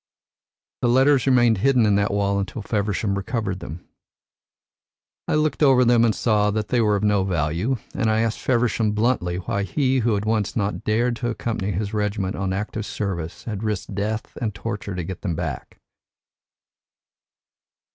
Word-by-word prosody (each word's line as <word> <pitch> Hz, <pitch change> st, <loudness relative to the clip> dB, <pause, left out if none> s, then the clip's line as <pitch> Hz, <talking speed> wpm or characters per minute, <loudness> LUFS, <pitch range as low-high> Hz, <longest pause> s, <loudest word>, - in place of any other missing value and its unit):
The -, -, +2 dB
letters 135 Hz, +1 st, +4 dB
remained 120 Hz, -5 st, +4 dB
hidden 125 Hz, 0 st, +3 dB
in 105 Hz, -, +3 dB
that 100 Hz, +1 st, +2 dB
wall 100 Hz, 0 st, +1 dB
until 100 Hz, +2 st, -4 dB
Feversham 105 Hz, -1 st, -1 dB
recovered 100 Hz, -1 st, -2 dB
them. 80 Hz, +2 st, -9 dB, 1.4 s
I -, -, +1 dB
looked 155 Hz, 0 st, 0 dB
over 130 Hz, -4 st, +5 dB
them 120 Hz, -1 st, +5 dB
and 115 Hz, -2 st, +3 dB
saw 105 Hz, -3 st, +2 dB
that 105 Hz, 0 st, -2 dB
they 120 Hz, -, +2 dB
were 105 Hz, -2 st, +3 dB
of 100 Hz, -, -2 dB
no 105 Hz, -2 st, +3 dB
value, 85 Hz, -, 0 dB, 0.2 s
and 115 Hz, -4 st, 0 dB
I 110 Hz, +1 st, +2 dB
asked 115 Hz, -1 st, -1 dB
Feversham 115 Hz, -3 st, +1 dB
bluntly 105 Hz, -5 st, 0 dB
why 95 Hz, +2 st, -2 dB
he, 130 Hz, +5 st, +1 dB
who 115 Hz, -2 st, +1 dB
had 100 Hz, +1 st, -2 dB, 0.3 s
not 105 Hz, -2 st, -1 dB
dared 120 Hz, +2 st, +1 dB
to 120 Hz, -, -2 dB
accompany 110 Hz, -3 st, -2 dB
his 100 Hz, +3 st, -3 dB
regiment 105 Hz, -2 st, -1 dB
on 95 Hz, -1 st, -2 dB
active 105 Hz, +2 st, -3 dB
service, 85 Hz, -5 st, -4 dB
had 105 Hz, -4 st, -5 dB
risked 105 Hz, -2 st, -3 dB
death 105 Hz, +2 st, -3 dB
and 110 Hz, -4 st, -2 dB
torture 100 Hz, -2 st, -5 dB
to 90 Hz, -, -3 dB
get 95 Hz, +2 st, -6 dB
them 90 Hz, -5 st, -2 dB
back." 80 Hz, -6 st, -5 dB
105 Hz, 165 wpm, -23 LUFS, 100-115 Hz, 1.4 s, over